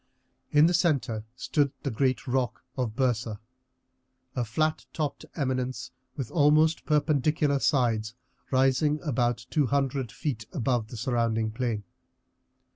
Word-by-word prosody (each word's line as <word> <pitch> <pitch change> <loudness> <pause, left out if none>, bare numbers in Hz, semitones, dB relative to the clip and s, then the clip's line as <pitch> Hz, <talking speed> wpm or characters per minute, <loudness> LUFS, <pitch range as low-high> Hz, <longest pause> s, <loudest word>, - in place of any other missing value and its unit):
In 150 +1 +6
the 175 - +3
centre 140 -11 +1
stood 140 +1 +1
the 140 - -1
great 130 +3 0
rock 125 -2 -1
of 120 -5 -2
Byrsa, 120 -4 0 1.0
a 125 - 0
flat 155 +8 -1
topped 150 -3 -3
eminence 130 -3 -2 0.3
with 135 -5 -4
almost 155 +1 +4
perpendicular 150 -1 +2
sides 120 -6 +1 0.3
rising 135 +3 +3
about 120 -5 0
two 150 -4 +2
hundred 135 -2 0
feet 125 -9 -4
above 125 -6 0
the 120 - -8
surrounding 115 -2 0
plain. 115 -2 -2
130 Hz, 120 wpm, -28 LUFS, 120-150 Hz, 1.0 s, In